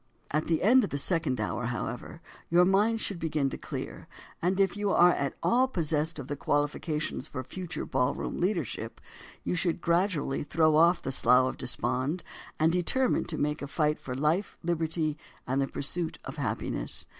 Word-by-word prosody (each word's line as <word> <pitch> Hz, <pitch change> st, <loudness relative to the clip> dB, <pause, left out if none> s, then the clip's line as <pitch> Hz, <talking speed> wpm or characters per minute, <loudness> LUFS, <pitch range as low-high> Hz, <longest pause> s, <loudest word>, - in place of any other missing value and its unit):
At 155 Hz, +1 st, +1 dB
the 165 Hz, -1 st, 0 dB
end 250 Hz, +5 st, +6 dB
of -, -, -1 dB
the 140 Hz, -, -2 dB
second 155 Hz, -3 st, +1 dB
hour, 120 Hz, -1 st, -2 dB
however, 125 Hz, +6 st, -5 dB, 0.3 s
your 175 Hz, +1 st, +5 dB
mind 210 Hz, +4 st, +3 dB
should 195 Hz, -5 st, -3 dB
begin 150 Hz, -4 st, 0 dB
to -, -, -4 dB
clear, -, -, -6 dB, 0.3 s
and 185 Hz, +3 st, +1 dB
if 195 Hz, -1 st, +3 dB
you 205 Hz, 0 st, -1 dB
are 175 Hz, -2 st, +6 dB
at 140 Hz, -5 st, -2 dB
all 255 Hz, +2 st, +4 dB
possessed 160 Hz, -, 0 dB
of 140 Hz, -4 st, -6 dB
the 145 Hz, -, -3 dB
qualifications 145 Hz, 0 st, -1 dB
for 130 Hz, -4 st, -5 dB
future 180 Hz, +2 st, -5 dB
ballroom 130 Hz, -1 st, -1 dB
leadership, 170 Hz, -, -2 dB, 0.4 s
you -, -, -1 dB
should 175 Hz, -1 st, 0 dB
gradually 170 Hz, -5 st, +1 dB
throw 155 Hz, +1 st, +2 dB
off 170 Hz, +3 st, +5 dB
the 135 Hz, -, -2 dB
slough 125 Hz, 0 st, +5 dB
of -, -, -7 dB
despond 130 Hz, +6 st, -1 dB, 0.4 s
and 160 Hz, +1 st, +4 dB
determine 210 Hz, +9 st, +1 dB
to 160 Hz, -, -5 dB
make 150 Hz, +1 st, -1 dB
a 140 Hz, -, -4 dB
fight 150 Hz, +1 st, 0 dB
for 125 Hz, -, -5 dB
life, 155 Hz, +9 st, 0 dB
liberty 160 Hz, -2 st, -1 dB, 0.3 s
and 130 Hz, +2 st, 0 dB
the 135 Hz, -, +1 dB
pursuit 160 Hz, +5 st, -3 dB
of -, -, -7 dB
happiness. -, -, -3 dB
160 Hz, 180 wpm, -29 LUFS, 140-180 Hz, 0.4 s, end